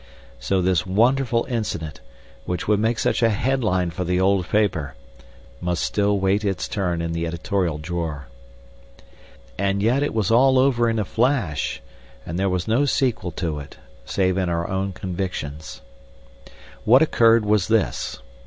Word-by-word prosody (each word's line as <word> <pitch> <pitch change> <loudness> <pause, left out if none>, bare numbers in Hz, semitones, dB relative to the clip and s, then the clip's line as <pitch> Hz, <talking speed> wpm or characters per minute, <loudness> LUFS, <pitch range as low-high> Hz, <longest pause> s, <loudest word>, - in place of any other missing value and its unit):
So 90 +10 0
this 90 -3 +2
wonderful 120 +4 +2
incident, 85 - -4 0.4
which 90 -2 -3
would 105 -1 +3
make 115 +2 +1
such - - 0
a 115 - +4
headline 105 -6 0
for 85 +3 -4
the 90 +1 0
old 95 -1 +2
paper, 90 -10 0 0.7
must 90 -1 -1
still 100 0 +1
wait 95 +2 +1
its 95 -3 -1
turn 90 -4 -2
in 85 - -3
the 85 0 -2
editorial 85 0 -1
drawer. 80 -3 -4 1.3
And 100 0 0
yet 125 +5 +2
it 145 - -1
was 110 -2 +1
all 130 +3 +5
over 125 -3 +3
in 115 - -1
a 105 - 0
flash, 100 - -1 0.4
and 85 +2 -4
there 95 0 +1
was 90 +1 -2
no 120 +6 +2
sequel 125 -9 0
to 80 -4 -3
it, 70 - -11 0.3
save 95 -1 0
in 90 -2 0
our 85 0 -1
own 95 +1 -2
convictions. 90 -5 -5 1.0
What 130 +7 +6
occurred 115 -7 +4
was 105 -3 +2
this. 110 -2 0
95 Hz, 155 wpm, -22 LUFS, 85-115 Hz, 1.3 s, What